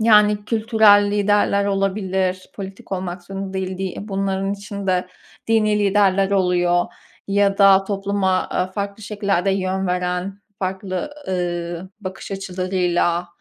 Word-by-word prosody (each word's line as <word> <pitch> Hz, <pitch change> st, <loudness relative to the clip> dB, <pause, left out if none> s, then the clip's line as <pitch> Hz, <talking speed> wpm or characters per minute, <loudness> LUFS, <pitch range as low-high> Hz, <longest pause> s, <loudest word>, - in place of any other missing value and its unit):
yani, 210 Hz, -2 st, +5 dB
kültürel 215 Hz, -2 st, +4 dB
liderler 205 Hz, -1 st, +2 dB
olabilir, 190 Hz, -2 st, -1 dB
politik 195 Hz, -1 st, -8 dB
olmak 180 Hz, -1 st, -4 dB
zorunda 195 Hz, +1 st, -6 dB
değil 190 Hz, -1 st, -3 dB
di -, -, -3 dB
i 195 Hz, +3 st, -5 dB
bunların 195 Hz, 0 st, -1 dB
içinde 200 Hz, -2 st, -2 dB, 0.4 s
dini 215 Hz, -2 st, +3 dB
liderler 195 Hz, -1 st, +3 dB
oluyor 180 Hz, -2 st, +2 dB, 0.4 s
ya 200 Hz, 0 st, +2 dB
da 195 Hz, -1 st, +6 dB
topluma 195 Hz, -1 st, -1 dB, 0.2 s
a 185 Hz, +1 st, -1 dB
farklı 200 Hz, +1 st, -4 dB
şekillerde 200 Hz, -2 st, 0 dB
yön 190 Hz, 0 st, -1 dB
veren, 180 Hz, +2 st, -2 dB, 0.2 s
farklı, 190 Hz, +7 st, -3 dB, 0.2 s
ııı, 175 Hz, 0 st, -3 dB
bakış 190 Hz, 0 st, -7 dB
açılarıyla 180 Hz, -2 st, 0 dB
195 Hz, 120 wpm, -21 LUFS, 185-200 Hz, 0.4 s, da